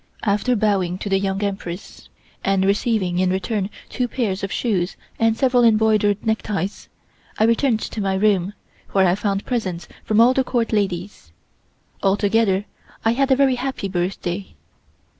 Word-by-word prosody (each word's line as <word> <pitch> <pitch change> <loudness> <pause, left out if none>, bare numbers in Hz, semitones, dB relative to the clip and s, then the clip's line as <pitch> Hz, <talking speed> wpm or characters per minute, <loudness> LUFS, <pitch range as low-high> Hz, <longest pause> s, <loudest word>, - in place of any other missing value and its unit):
After 210 +4 +1
bowing 195 -5 +1
to 200 - -5
the 195 0 +2
Young 195 +1 -1
Empress 195 -2 -5 0.3
and 195 -1 +2
receiving 200 -3 +1
in 185 0 +2
return 190 +1 -1 0.2
two 250 -1 -2
pairs 215 -7 -2
of 195 - -3
shoes 195 -7 -1 0.2
and 225 -1 +2
several 250 -1 +3
embroidered 215 -2 +3
neckties, 210 -4 -2 0.5
I - - +2
returned 230 0 +2
to 215 - -4
my 195 -1 0
room, 195 -1 +2 0.4
where 195 -1 +4
I 175 - +3
found 200 0 -1
presents 185 -9 -3 0.2
from 215 0 +1
all 240 +2 +6
the 265 - +2
Court 235 -3 -1
ladies. 190 - -2 0.7
Altogether 200 0 +2 0.4
I 225 - +4
had 270 +3 +1
a 265 - +5
very 270 -1 +3
happy 260 -5 -3
birthday. 180 +1 -3
205 Hz, 155 wpm, -21 LUFS, 190-225 Hz, 0.7 s, all